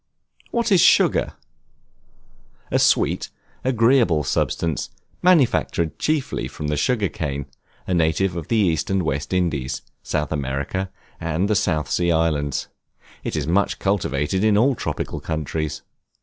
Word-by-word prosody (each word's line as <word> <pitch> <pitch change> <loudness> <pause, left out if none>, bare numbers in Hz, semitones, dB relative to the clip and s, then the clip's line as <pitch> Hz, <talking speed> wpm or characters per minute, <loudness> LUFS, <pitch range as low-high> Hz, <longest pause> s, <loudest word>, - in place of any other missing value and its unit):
What 235 -2 0
is 185 -4 +6
Sugar? - - +4 1.4
A - - +3
sweet, - - +2 0.3
agreeable 115 - +3
substance, 80 +3 -1 0.3
manufactured 135 - +2
chiefly 155 -3 -1
from 75 - -5
the 75 - 0
Sugar 105 - +1
Cane, 70 -5 -4 0.4
a 95 - -1
native 85 +2 +1
of 85 -3 -5
the 115 - +1
East 85 -7 +1
and 95 -1 +1
West 70 -2 -2
Indies, 75 -8 -1 0.2
South 75 -1 -2
America 70 +6 -2 0.3
and 85 +4 -1
the 105 - +1
South 80 -6 +1
Sea 85 -1 +1
Islands; 75 -4 0 0.6
it - - -3
is 75 -2 -1
much 90 +6 +1
cultivated 95 -2 0
in 110 -1 +4
all 130 +6 +4
tropical - - -4
countries. 80 -1 -3
85 Hz, 135 wpm, -22 LUFS, 75-100 Hz, 1.4 s, is